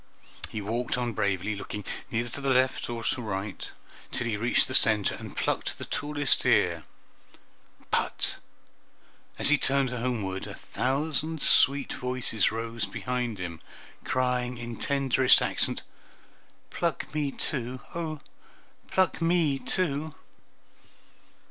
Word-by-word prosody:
He 105 - -4
walked 115 +4 -1
on 120 -2 -1
bravely, 100 +1 0
looking 105 0 -6 0.2
neither 120 +1 -1
to 140 - -6
the 135 - 0
right 130 +1 +5 0.2
nor 115 -1 -4
left, 105 -7 -3 0.4
till - - -1
he 115 -3 0
reached 115 +4 +3
the 130 - -5
center 105 -5 +6
and - - -9
plucked - - -1
the - - -6
tallest 145 -1 +1
ear, - - +3 1.1
but - - +1 1.0
as - - +3
he 150 -1 +5
turned 135 -1 +3
homeward 115 -6 -2
a - - -7
thousand 155 +4 -1
sweet 140 0 +4
voices 125 -4 0
rose 115 0 -3
behind 125 -3 -3
him, 85 -3 -6 0.4
crying 125 -1 0
in 120 -1 -6
tenderest 135 -2 +4
accents, - - 0 0.9
"Pluck 165 -3 -2
me 150 -2 0
too! 130 -3 -2
oh, 160 -3 -4 0.7
please - - -22
pluck 185 -2 +2
me 165 -5 +2
too!" 155 -4 -1
125 Hz, 125 wpm, -28 LUFS, 115-140 Hz, 1.1 s, center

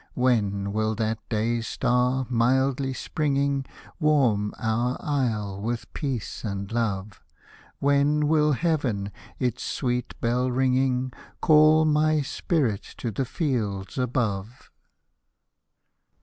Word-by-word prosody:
When 100 -6 +1
will 110 0 0
that 110 0 -1
day 115 +1 0
star, 125 +3 +1
mildly 130 +3 +1
springing, 140 -1 -1 0.3
Warm 130 -10 +2
our 120 +3 0
isle 110 -9 -1
with 115 +2 -4
peace 135 -7 -4
and 100 -1 -4
love? 105 -4 -2 0.6
When 145 +1 +2
will 150 -1 +3
heaven, 130 - 0 0.3
its 125 -4 -1
sweet 125 -2 -2
bell 125 +2 +1
ringing. 130 0 +1 0.3
Call 155 0 +6
my 155 0 +3
spirit 135 - 0 0.2
to 120 - -3
the 130 +6 -2
fields 115 - -2
above 115 -3 -2
125 Hz, 105 wpm, -25 LUFS, 110-140 Hz, 0.6 s, Call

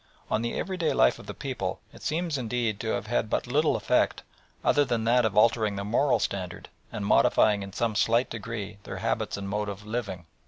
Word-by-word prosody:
On 110 - +2
the 120 0 -2
everyday 180 -4 -1
life - - +4
of - - -12
the - - -5
people - - -3
it - - -14
seems 165 0 -1
indeed 120 -4 -1
to 115 - -4
have 110 - -1
had 110 0 0
but - - 0
little 150 +5 +2
effect - - +1 0.4
other 145 - +4
than 120 -5 -1
that 120 +1 +4
of 105 -2 -1
altering 110 -2 +4
their 100 0 -4
moral 125 +6 +3
standard 90 -3 -4 0.2
and 105 - -4
modifying 105 0 +4
in 100 0 -6
some 115 +3 -1
slight 115 +4 +3
degree 105 -2 -6
their - - -7
habits - - -1
and 100 0 -5
mode 105 +1 -2
of 100 +1 -7
living. 105 -6 -4
110 Hz, 205 wpm, -27 LUFS, 100-120 Hz, 0.4 s, life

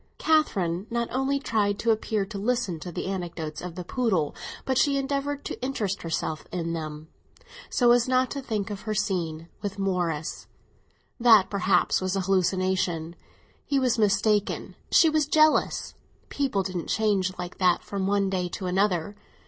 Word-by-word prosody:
Catherine 195 - +1
not 235 0 -1
only 270 +2 +1
tried 210 -6 0
to 230 - +2
appear 215 -2 0
to 200 0 -7
listen 215 -6 -1
to 175 +4 -7
the - - -4
anecdotes 175 -5 -4
of 180 -2 -7
the 180 - -5
poodle, 185 - 0 0.3
but 260 -1 +1
she 280 -2 +3
endeavoured 280 +1 -2
to - - -5
interest 215 -7 -2
herself 160 -1 -3
in 170 -2 -2
them, 155 -1 -6 0.6
so 240 -2 +4
as 240 0 +4
not 255 0 +2
to 280 - -3
think 215 -6 -3
of 200 -1 -5
her 215 0 -3
scene 170 -6 -2
with 205 -1 -4
Morris. 175 -6 -2 0.7
That 225 -5 +6
perhaps 195 -1 +2
was 185 +1 -1
an 195 - 0
hallucination; 185 -3 0 0.5
he 280 - 0
was 250 -3 +2
mistaken, 205 0 +1 0.2
she 330 - +6
was 310 -2 +2
jealous; 310 0 +3 0.4
people 265 -9 0
didn't 185 -2 -4
change 195 -4 +1
like 180 0 -7
that 180 -2 +3
from 195 -1 -3
one 200 0 +2
day 185 -2 -1
to 190 - -4
another. 190 +1 0
195 Hz, 165 wpm, -26 LUFS, 180-235 Hz, 0.7 s, That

